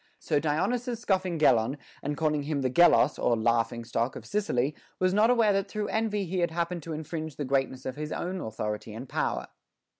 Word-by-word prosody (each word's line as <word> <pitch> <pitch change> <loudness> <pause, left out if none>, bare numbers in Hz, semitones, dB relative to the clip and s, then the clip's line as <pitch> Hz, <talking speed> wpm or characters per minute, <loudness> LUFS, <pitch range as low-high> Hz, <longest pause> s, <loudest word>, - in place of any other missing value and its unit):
So - - 0
Dionysius 230 - 0
scoffing 190 -6 0
Gelon, 130 -3 +3 0.2
and 145 0 -3
calling 150 -1 +1
him 140 -1 -2
the 130 - +1
Gelos 160 -2 +5
(or 120 - +3
laughing 115 +1 +1
stock) 120 +3 -1
of - - -8
Sicily, 150 -10 0 0.2
was 185 0 +2
not 215 +3 +4
aware 230 -4 +4
that 195 0 0
through 210 0 -3
envy 215 -2 0
he 185 +1 -2
had 170 - +2
happened 170 +1 -2
to 160 +1 -6
infringe 155 -1 -5
the 145 - -3
greatness 130 -1 -1
of 130 +1 -4
his 150 0 -4
own 185 +1 -3
authority 105 0 -4
and 125 +4 -7
power. - - -2
155 Hz, 200 wpm, -28 LUFS, 130-190 Hz, 0.2 s, Gelos